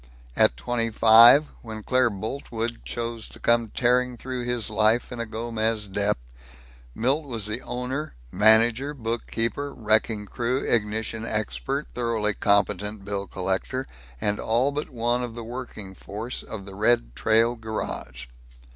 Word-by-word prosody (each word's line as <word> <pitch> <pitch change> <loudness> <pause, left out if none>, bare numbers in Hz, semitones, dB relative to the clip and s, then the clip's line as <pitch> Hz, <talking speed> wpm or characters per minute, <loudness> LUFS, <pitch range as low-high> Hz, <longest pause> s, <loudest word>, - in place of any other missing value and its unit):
At - - +4
twenty 115 - -1
five, 115 +6 +8 0.2
when 110 -2 -8
Claire 130 0 +3
Boltwood 115 +2 -4
chose 115 -1 -4
to - - -13
come 120 -1 +2
tearing 125 0 +2
through 125 0 -5
his 120 -3 -1
life 110 +3 +2
in 120 - -6
a 115 - -3
Gomez 110 -1 -1
Dep, 100 +1 0 0.8
Milt 135 +7 +1
was 115 -6 -4
the 105 0 -3
owner, 125 - -4 0.2
manager, 115 +6 +4
bookkeeper, 115 +2 -3
wrecking 110 -2 +1
crew, 120 +5 -1
ignition 110 0 0
expert, 115 +6 -2
thoroughly 115 -3 0
competent 100 0 +1
bill 100 -1 -3
collector, 95 +8 -2 0.3
and 105 +7 0
all 120 +5 +2
but 150 +2 -4
one 120 -1 0
of 120 -2 -5
the 120 - -6
working 115 -5 -7
force 110 +6 -6
of 100 -3 -8
the 100 - -9
Red 105 - +1
Trail 115 +2 +3
Garage. 110 - -5
115 Hz, 140 wpm, -25 LUFS, 105-120 Hz, 0.8 s, five